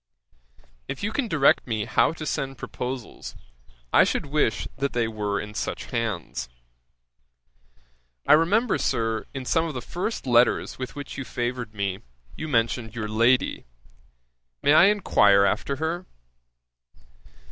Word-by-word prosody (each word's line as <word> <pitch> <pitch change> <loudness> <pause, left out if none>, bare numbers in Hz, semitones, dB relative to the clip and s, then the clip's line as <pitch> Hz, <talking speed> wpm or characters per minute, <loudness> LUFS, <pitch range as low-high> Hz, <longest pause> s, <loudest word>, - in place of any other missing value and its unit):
'If 135 - -6
you 210 - -1
can 245 +2 -1
direct 150 -9 +3
me 110 -3 -1
how - - +3
to 160 -1 -7
send 135 -2 -3
proposals, 125 -1 -6 0.6
I - - +7
should - - -1
wish 140 -8 0
that 140 0 -1
they 120 -2 +1
were 105 -2 -2
in 105 0 -7
such 105 - -4
hands. 85 - -3 1.8
'I - - +7
remember, 195 +9 +3
Sir, 115 -1 -1
in 130 -1 -5
some 165 +6 +2
of 160 -4 -5
the - - -2
first 180 - -4
letters 120 0 +2
with 130 +2 -6
which 145 -1 -7
you - - -3
favoured 120 -2 -4
me, 100 -2 -2 0.4
you 155 - -5
mentioned 115 -3 0
your 110 -2 -3
lady. 115 - +2 1.0
May 145 - +5
I 165 - +8
enquire 105 - +4
after 140 +7 0
her? 160 +5 -3
125 Hz, 140 wpm, -25 LUFS, 110-155 Hz, 1.8 s, I